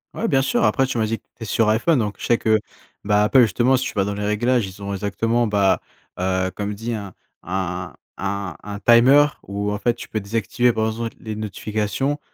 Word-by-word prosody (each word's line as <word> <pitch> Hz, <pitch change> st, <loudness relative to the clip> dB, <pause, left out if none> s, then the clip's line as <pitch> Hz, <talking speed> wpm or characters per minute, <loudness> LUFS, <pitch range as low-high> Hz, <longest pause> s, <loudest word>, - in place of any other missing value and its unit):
Ouais 230 Hz, -, -1 dB
bien 135 Hz, -10 st, +3 dB
sûr. 240 Hz, -, +1 dB
Après 135 Hz, -3 st, +3 dB
tu 120 Hz, -, -3 dB
m'as 110 Hz, -, +2 dB
dit 115 Hz, +1 st, -2 dB
que -, -, -47 dB
tu -, -, -48 dB
étais 115 Hz, -, -8 dB
sur 110 Hz, +1 st, +2 dB
IPhone, 125 Hz, +6 st, +2 dB
donc 105 Hz, -2 st, -2 dB
je -, -, -5 dB
sais 120 Hz, -, +3 dB
que, 110 Hz, -1 st, +3 dB, 0.4 s
bah, 105 Hz, 0 st, +3 dB
Apple 130 Hz, +5 st, +5 dB
justement 120 Hz, +5 st, +3 dB
si 130 Hz, -, -2 dB
tu -, -, -4 dB
vas 100 Hz, -2 st, +1 dB
dans 100 Hz, -, -3 dB
les 105 Hz, 0 st, -3 dB
réglages, 120 Hz, +3 st, +1 dB
ils 95 Hz, +1 st, -11 dB
ont 100 Hz, -, -4 dB
exactement 115 Hz, +4 st, 0 dB
bah, 100 Hz, -3 st, +2 dB, 0.4 s
heu, 95 Hz, 0 st, 0 dB
comme 105 Hz, 0 st, -3 dB
dis 115 Hz, +3 st, -4 dB
hein, 100 Hz, -3 st, -7 dB, 0.3 s
un 90 Hz, -1 st, -3 dB, 0.2 s
un 100 Hz, -2 st, -3 dB
un 100 Hz, -1 st, -6 dB
timer, 125 Hz, +7 st, +6 dB, 0.2 s
où 100 Hz, +1 st, -2 dB
en 105 Hz, -, -2 dB
fait 120 Hz, +3 st, +1 dB
tu 120 Hz, -, -10 dB
peux 110 Hz, -, -2 dB
désactiver 115 Hz, +4 st, 0 dB
par 110 Hz, 0 st, 0 dB
exemple 115 Hz, +1 st, -3 dB
les 110 Hz, -1 st, -6 dB
notifications. 110 Hz, +6 st, -2 dB
110 Hz, 230 wpm, -22 LUFS, 100-120 Hz, 0.4 s, timer